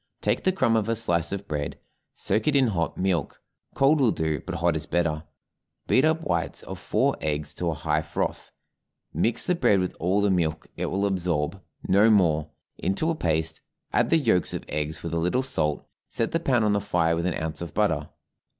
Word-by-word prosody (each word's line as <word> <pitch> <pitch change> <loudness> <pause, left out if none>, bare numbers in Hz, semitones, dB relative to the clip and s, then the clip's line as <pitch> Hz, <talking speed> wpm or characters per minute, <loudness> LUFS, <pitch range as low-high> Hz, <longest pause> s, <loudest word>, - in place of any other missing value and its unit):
Take - - 0
the 190 - +5
crumb 130 -11 +2
of 110 0 +1
a 115 - +2
slice 85 -7 0
of 100 0 -4
bread, 75 -1 -3 0.4
soak 110 - -1
it 150 - +3
in 130 -4 +4
hot 85 -5 -1
milk 90 -5 -1 0.4
(cold 145 +2 +4
will 125 - +5
do, 80 - -1
but - - -3
hot 85 0 +1
is 75 -1 -3
better), 85 -2 0 0.6
beat 130 - +3
up 160 +1 +2
whites 85 - -2
of - - -7
four - - +1
eggs 75 -1 -2
to 90 - -2
a 80 - -2
high 75 +1 0
froth; 75 0 -3 0.6
mix 110 +9 0
the 180 - +2
bread 105 - +3
with 90 0 -2
all 95 +4 +1
the 100 -1 +2
milk 80 -4 0
it - - -2
will 100 +1 0
absorb, 90 -2 -1 0.3
no 100 +4 +5
more, 80 -7 +3 0.3
into 95 - 0
a - - -1
paste, 80 - -1 0.3
add - - +2
the 165 - +5
yolks 115 - +2
of - - -5
eggs 75 +1 -3
with 85 -1 -4
a 85 - +1
little 90 +10 +1
salt, 75 - -1 0.2
set 115 - -1
the 165 - +1
pan 125 -7 +2
on 105 -1 +3
the 100 - +1
fire 85 -4 +1
with 85 +2 -1
an 90 - -1
ounce 80 0 -4
of 85 -4 -7
butter. - - +1
90 Hz, 210 wpm, -26 LUFS, 80-110 Hz, 0.6 s, the